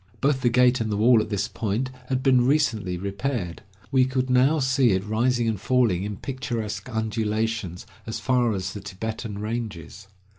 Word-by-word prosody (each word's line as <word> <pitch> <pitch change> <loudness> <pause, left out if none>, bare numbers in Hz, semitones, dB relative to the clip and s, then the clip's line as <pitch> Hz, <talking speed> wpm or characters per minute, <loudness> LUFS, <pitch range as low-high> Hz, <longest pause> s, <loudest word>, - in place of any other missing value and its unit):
Both 135 -1 +1
the 120 - +3
gate 125 0 +4
and 110 -1 -1
the 100 - 0
wall 115 +1 +5
at 105 - -5
this 100 -1 -1
point 115 +5 -2 0.2
had 130 0 -1
been 130 -3 +5
recently 120 -10 +1
repaired. 100 -1 -3 0.3
We 130 -2 +5
could 130 0 -1
now 130 +5 +4
see 130 -4 +3
it 95 +1 -1
rising 120 +2 +1
and 110 -4 -1
falling 120 -7 +2
in 105 -1 -4
picturesque 115 -5 -4
undulations 110 -4 -2 0.2
as 110 - -3
far 125 -3 +2
as 95 -1 -3
the 105 - -7
Tibetan 105 +2 -5
ranges. 105 -4 -5
115 Hz, 175 wpm, -25 LUFS, 105-125 Hz, 0.3 s, wall